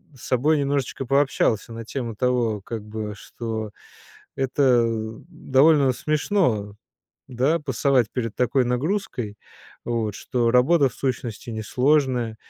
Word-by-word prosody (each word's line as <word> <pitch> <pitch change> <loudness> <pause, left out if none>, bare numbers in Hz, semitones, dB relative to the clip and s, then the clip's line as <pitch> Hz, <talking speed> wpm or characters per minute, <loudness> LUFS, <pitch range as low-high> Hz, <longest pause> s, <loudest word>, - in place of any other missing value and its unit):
с 125 - -16
собой 145 +5 +2
немножечко 140 -2 -1
пообщался 135 -5 +1
на 115 0 -7
тему 120 -2 -4
того 120 -3 0
как 110 +2 -6
бы, 105 0 -5
что 110 -1 -6 0.6
это 130 -2 +3 0.5
довольно 145 -3 +3
смешно, 145 - 0 0.5
да, 135 +6 +1
пасовать 135 -4 +1
перед 115 -4 -3
такой 125 +1 +2
нагрузкой, 125 - -2 0.5
вот, 115 -3 -2
что 120 +2 0
работа, 135 +4 +4
в 120 - -15
сущности, 120 -4 -4
несложная, 125 +1 +1
125 Hz, 115 wpm, -23 LUFS, 115-140 Hz, 0.6 s, работа